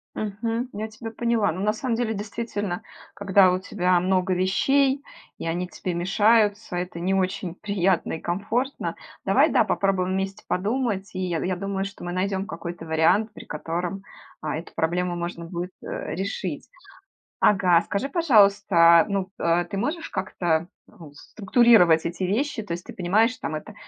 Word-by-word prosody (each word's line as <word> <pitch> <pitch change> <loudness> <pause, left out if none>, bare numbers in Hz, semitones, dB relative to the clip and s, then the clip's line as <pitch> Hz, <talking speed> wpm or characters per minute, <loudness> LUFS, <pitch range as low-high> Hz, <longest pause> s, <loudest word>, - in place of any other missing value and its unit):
Мгм, 225 +4 -3
я 215 +2 -4
тебя 225 +1 -8
поняла. 230 -3 +1
Ну, 170 - -6
на 210 +1 +1
самом 235 +1 -2
деле, 230 -1 -1
действительно, 205 -3 -4 0.3
когда 195 -2 +4
у 180 - 0
тебя 180 -2 +1
много 185 +1 +1
вещей 270 +10 +2 0.3
и - - -6
они 175 +2 -2
тебе 180 0 -5
мешаются- 205 +2 +2
это 175 -1 -4
не 185 +2 0
очень 185 -2 -1
приятно 190 -2 0
и 160 - -4
комфортно. 220 +10 -2 0.3
Давай, - - +4
да, - - +4
попробуем 185 -2 0
вместе 195 0 -3
подумать, 205 0 -1
и 185 - -5
я, 175 -3 -1
я 185 0 -1
думаю, 195 +1 -2
что 195 -2 -7
мы 175 - -4
найдем 190 +1 -1
какой-то 170 -3 -7
вариант, 165 +7 +2
при - - -10
котором, 175 +5 -4 0.4
а, 155 - -3
эту 165 - -9
проблему 175 +2 -1
можно 170 0 -5
будет, 175 +2 -5
э, - - -5
решить. 190 -2 -4 0.7
Ага, 180 -4 +5
скажи 200 +9 -2
пожалуйста, 200 - +5
ну, 195 -2 -1
э, 170 +1 +1
ты 175 - -7
можешь 305 - -2
как-то, 175 -3 -1 0.2
ну, 160 -4 -14
структурировать 195 - +4
эти 170 +2 -3
вещи? 220 +5 -1
То 205 - -9
есть 175 +1 -4
ты - - -9
понимаешь, 215 +7 +2
там 155 - -4
это: 155 +8 -7
190 Hz, 165 wpm, -24 LUFS, 175-215 Hz, 0.7 s, Ага